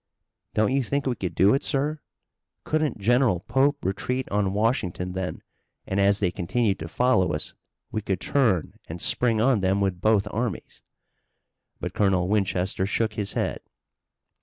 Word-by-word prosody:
"Don't 110 +1 +2
you 135 +1 +2
think 140 +3 -1
we 130 - +1
could 90 -6 -4
do 100 +2 +5
it, 135 - +1
sir? 150 +2 -1 0.6
Couldn't 155 -1 0
General 115 -2 +2
Pope 135 +6 +1
retreat 125 +7 -2
on 100 -1 +1
Washington 100 -4 -1
then, 95 0 -4 0.4
and, 95 - -1
as 100 0 +4
they 90 -4 +1
continued 100 +3 0
to 80 - -5
follow 95 -2 +2
us, 75 - -3 0.4
we 110 - -2
could 95 -3 -2
turn 110 - +1 0.2
and 85 +2 -6
spring 115 +4 +2
on 120 0 +3
them 95 +1 +1
with 95 -3 -1
both 110 -2 +3
armies." 115 -3 -4 1.0
But - - -4
Colonel 95 -3 +2
Winchester 95 -2 0
shook 110 +1 0
his 105 -2 -2
head. - - -1
105 Hz, 160 wpm, -25 LUFS, 95-125 Hz, 1.0 s, do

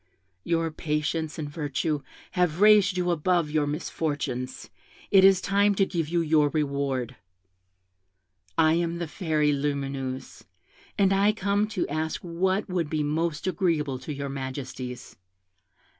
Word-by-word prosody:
Your 165 -1 0
patience 155 +1 -2
and 155 -2 -4
virtue 145 0 -2 0.3
have 180 -3 +1
raised 205 -2 +6
you 180 -1 +1
above 170 -1 +1
your 150 -1 +1
misfortunes: 145 -4 -3 0.4
it 190 -1 +7
is 190 -1 +7
time 200 +1 +2
to 195 - +3
give 165 -5 -2
you 170 0 +1
your 155 -2 +3
reward. 140 -4 -2 1.4
I 160 0 +5
am 170 0 0
the 170 -1 -3
Fairy 150 -2 +1
Lumineuse, 140 -2 -3 0.6
and 195 -1 +4
I 200 +2 +3
come 205 0 0
to - - +1
ask 155 +2 -2
what 185 +3 0
would 175 -5 -1
be 155 -1 0
most 155 +1 -1
agreeable 165 -8 0
to 130 - -7
your 140 -1 -4
majesties. 130 -2 -6
160 Hz, 135 wpm, -26 LUFS, 145-180 Hz, 1.4 s, it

